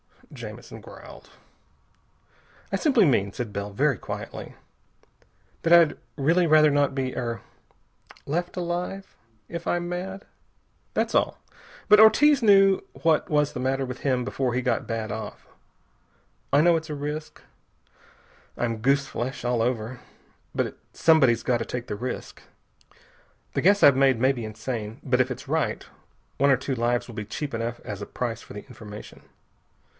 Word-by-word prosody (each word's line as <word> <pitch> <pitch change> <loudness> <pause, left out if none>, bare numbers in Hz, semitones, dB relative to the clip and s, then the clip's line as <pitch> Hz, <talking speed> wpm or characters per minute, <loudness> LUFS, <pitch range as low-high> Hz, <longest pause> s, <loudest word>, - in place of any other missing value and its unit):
Jamison - - -9
growled. - - -13 1.4
"I - - +1
simply 265 - +4
mean," 100 - +2
said 120 -4 -5
Bell 100 +1 -3
very 135 +5 +1
quietly, - - -7 1.1
"that 165 - +3
I'd 170 -3 +6 0.2
really 165 +5 +2
rather 155 -1 +6
not 140 -1 +2
be 130 -2 -2
er 115 -4 -3 0.8
left 175 +4 -2
alive 180 +2 -4 0.4
if 170 0 -6
I'm 175 0 -1
mad. 190 +2 -5 0.7
That's - - 0
all. - - +2 0.5
But 210 0 +8
Ortiz 280 +6 +6
knew 195 -3 +5
what 160 -2 +1
was 150 -1 +2
the - - -6
matter 135 +1 0
with 125 0 -7
him 130 -3 0
before 125 0 -2
he 125 - 0
got 120 -3 -1
bad 115 -1 -3
off. 110 0 -7 1.1
I 140 - +5
know 170 +1 +5
it's 160 0 -7
a 150 - -3
risk. 150 +2 -6 1.1
I'm 115 -2 -1
goose 135 +5 +2
flesh 130 +1 -5
all 120 -1 +1
over. 120 0 -2 0.6
But - - -2 0.2
somebody's 130 -8 +4
got 125 - +2
to 115 - -4
take 125 -1 -5
the - - -3
risk. 125 +5 -6 1.1
The - - 0
guess 200 +3 +4
I've 140 -2 +7
made 135 -2 +4
may 130 +4 +3
be 120 -4 -5
insane, 110 +1 -5
but 130 -1 +2
if 130 - 0
it's 130 - -7
right - - -1 0.5
one 140 +1 +3
or 135 - +5
two 135 +2 -3
lives 120 0 0
will 115 - -9
be 105 -2 -4
cheap 140 +6 -5
enough 115 +1 -3
as 105 -1 -7
a 100 - -6
price 120 -3 -4
for - - -12
the 105 - -8
information. 110 -5 -11
135 Hz, 160 wpm, -25 LUFS, 120-160 Hz, 1.4 s, But